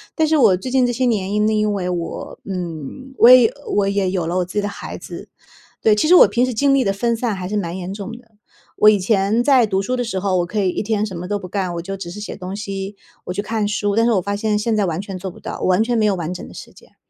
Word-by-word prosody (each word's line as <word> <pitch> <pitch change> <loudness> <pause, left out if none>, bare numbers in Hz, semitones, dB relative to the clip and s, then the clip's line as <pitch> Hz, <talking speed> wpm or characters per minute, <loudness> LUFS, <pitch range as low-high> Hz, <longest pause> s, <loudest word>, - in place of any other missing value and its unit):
但 315 -1 +2
是 315 0 +3
我 225 -9 +5
最 255 - -6
近 260 -1 +3
这 245 - 0
些 255 +2 0
年 205 -5 0
因 210 0 +2
因 215 -1 +1
为 185 -3 -2
我， 175 -2 -5
嗯， 180 - -6
我 230 - +7
也 250 -3 +8 0.2
我 200 -1 +2
也 200 -1 0
有 180 -3 -1
了 175 +2 -1
我 180 - +1
自 180 - -12
己 210 - +1
的 205 - -2
孩 205 - -7
子。 - - -10 0.5
对， 215 - +4
其 210 - +1
实 350 - +5
我 - - +8
平 240 - +1
时 255 - -2
精 275 +5 +2
力 275 -1 +3
的 195 - +1
分 235 +4 0
散 225 -2 -2
还 185 -1 -5
是 210 - -3
蛮 175 -4 -3
严 185 0 -6
重 200 +1 -6
的。 235 -2 -17 0.5
我 210 - +7
以 210 -1 +3
前 200 +3 +1
在 260 -3 +5
读 195 -1 0
书 250 +6 -1
的 245 - -1
时 225 -5 -3
候， 190 -1 0
我 175 - 0
可 210 +5 -3
以 190 -2 +2
一 - - -2
天 215 0 0
什 195 -4 -7
么 175 +1 -6
都 205 - 0
不 185 - -8
干， 185 -1 -2
我 170 - -3
就 195 +3 -5
只 190 -3 -7
是 205 - -8
写 210 - -6
东 185 +1 -7
西， 195 -1 -5 0.3
我 - - -4
去 200 - -2
看 220 0 -1
书， 205 -1 -1
但 225 - +3
是 240 - +3
我 190 - +2
发 200 +3 -3
现 210 0 0
现 220 +1 0
在 210 -2 +1
完 170 -2 -2
全 195 -1 -6
做 190 +1 -5
不 - - -15
到， - - -7
我 - - 0
完 185 +3 +3
全 240 +1 -1
没 215 - +2
有 205 -2 +2
完 170 -1 -4
整 180 - -8
的 - - -13
时 - - -11
间。 - - -20
205 Hz, 330 characters per minute, -20 LUFS, 185-225 Hz, 0.5 s, 也